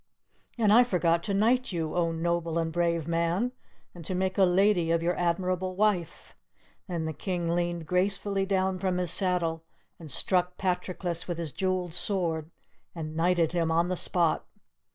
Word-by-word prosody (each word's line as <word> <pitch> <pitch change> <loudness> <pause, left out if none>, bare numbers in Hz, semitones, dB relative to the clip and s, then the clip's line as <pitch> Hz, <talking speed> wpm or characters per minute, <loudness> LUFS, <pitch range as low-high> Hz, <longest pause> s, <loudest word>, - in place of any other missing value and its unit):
"And 215 -3 +4
I 240 +3 +8
forgot 170 -7 +1
to 200 - -1
knight 240 +5 +2
you, 165 -3 -2
oh, 170 -1 +1
noble 170 0 -1
and 165 -1 0
brave 170 -2 0
man, 170 +8 0 0.4
and 175 - -10
to 185 - -2
make 185 0 0
a 190 - +7
lady 180 -1 +3
of 165 0 +1
your 175 +1 +1
admirable 185 +1 -1
wife!" 190 -5 -1 0.5
Then 170 -4 -3
the 160 - -3
King 175 +2 -3
leaned 175 -1 -1
gracefully 195 +2 0
down 190 -1 0
from 185 -1 0
his 180 -3 0
saddle, 170 -4 +1 0.4
and 160 -3 -10
struck 180 +4 +1
Patroclus 180 -2 -2
with 175 -2 -3
his 165 -3 -4
jeweled 185 -3 -1
sword 165 -5 -1 0.5
and 155 -2 -6
knighted 170 0 +2
him 170 -2 0
on 165 +1 +2
the 185 - 0
spot. 170 -2 0
175 Hz, 170 wpm, -28 LUFS, 165-185 Hz, 0.5 s, I